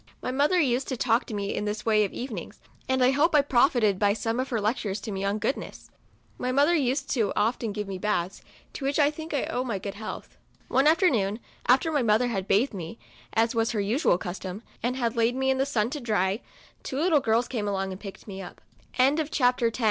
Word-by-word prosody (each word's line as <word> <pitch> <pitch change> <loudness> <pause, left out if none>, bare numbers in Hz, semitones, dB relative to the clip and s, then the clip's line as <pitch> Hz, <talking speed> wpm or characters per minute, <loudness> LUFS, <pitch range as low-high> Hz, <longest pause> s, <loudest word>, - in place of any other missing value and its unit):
My - - -3
mother 290 +7 +2
used 265 -3 +1
to 260 - -3
talk 230 0 +2
to - - -8
me 200 0 -2
in 210 - -2
this 210 0 -3
way 215 -2 +4
of 200 - -2
evenings, 235 -9 -6 0.3
and 260 -1 +2
I 255 - +5
hope 305 +4 +2
I 290 - +6
profited 240 -7 +3
by 205 -1 +3
some 225 +2 -2
of 260 - -2
her 235 - 0
lec 215 +5 0
tures 205 -3 -3
to 215 - -4
me 195 0 -3
on 200 +1 0
goodness. 225 +6 -4 0.5
My 250 - -1
mother 285 +5 +4
COUNTRY 315 -6 +2
DOLL. 250 - +2
45 275 - -3
used 210 -3 +1
often 225 +2 0
to - - -4
give 210 - -3
me 195 -1 -4
baths, 190 -2 -1 0.3
to - - -7
which 275 +1 0
I 295 -1 +4
think 315 +1 -8
I 280 - 0
owe 250 - -2
my 230 -6 -2
good 195 +1 -5
health. 215 +1 -8 0.3
One 270 +3 +3
after 335 +5 +5
noon, 210 -2 0 0.3
after 265 +6 +4
my 290 -3 +2
mother 230 +2 +3
had 195 -4 -3
bathed 220 +7 +2
me, 170 -4 -6 0.4
as 225 +2 +2
was 225 0 0
her 215 - -1
usual 205 - +2
custom, 185 +3 -6 0.2
and 245 +2 -1
had 235 -3 -1
laid 230 +1 +2
me 265 0 +1
in 265 - 0
the 270 - +1
sun 235 -4 0
to 295 - -3
dry, 210 -4 0 0.4
two 265 - -5
little 320 0 +3
girls 235 -1 +1
came 220 -5 -3
alo 195 -1 -2
230 Hz, 225 wpm, -26 LUFS, 205-265 Hz, 0.5 s, I